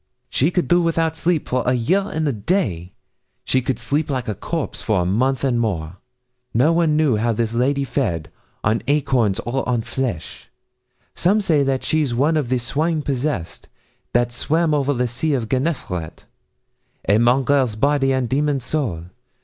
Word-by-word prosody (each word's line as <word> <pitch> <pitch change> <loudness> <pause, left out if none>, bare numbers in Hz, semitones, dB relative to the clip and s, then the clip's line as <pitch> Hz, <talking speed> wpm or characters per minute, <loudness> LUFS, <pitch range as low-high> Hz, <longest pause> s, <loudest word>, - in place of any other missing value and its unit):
She 145 - +2
could 180 -1 0
do 175 0 +4
without 165 -1 0
sleep 165 -1 0
for 125 0 0
a 125 - +1
year 165 +12 +1
and 160 -3 -1
a 140 - +1
day; 100 - -1 0.5
She 130 - +2
could 125 -1 -2
sleep 145 +6 -1
like 130 -3 -2
a 110 - -1
corpse, 160 - -4
for 105 -5 +1
a - - -1
month 125 +8 +1
and 125 -3 +1
more. 90 -6 -2 0.6
No 140 +8 +4
one 165 -3 +2
knew 150 -7 +3
how 115 +2 +1
this 115 +1 -1
lady 135 +4 +1
fed 115 - -2 0.3
On 110 +2 +1
acorns 135 -8 +2
or 130 +3 -2
on 120 -2 0
flesh. 125 -12 -4 0.6
Some 195 +5 +2
say 165 -8 +2
that 135 -1 0
she's 150 -6 0
one 145 +6 +2
of 145 -6 0
the 130 - +2
swine 150 +6 -1
possessed, 135 - -3 0.5
That 120 0 +2
swam 155 +6 0
over 145 -1 +1
the 125 -2 0
sea 140 +6 -1
of 120 -4 -2
Gennesaret. 125 - -3 0.8
A 105 +2 +4
mongrel 130 +2 +3
body 140 +2 +2
and 130 -2 0
demon 145 +2 +1
soul. 125 - -2
130 Hz, 175 wpm, -21 LUFS, 115-150 Hz, 0.8 s, do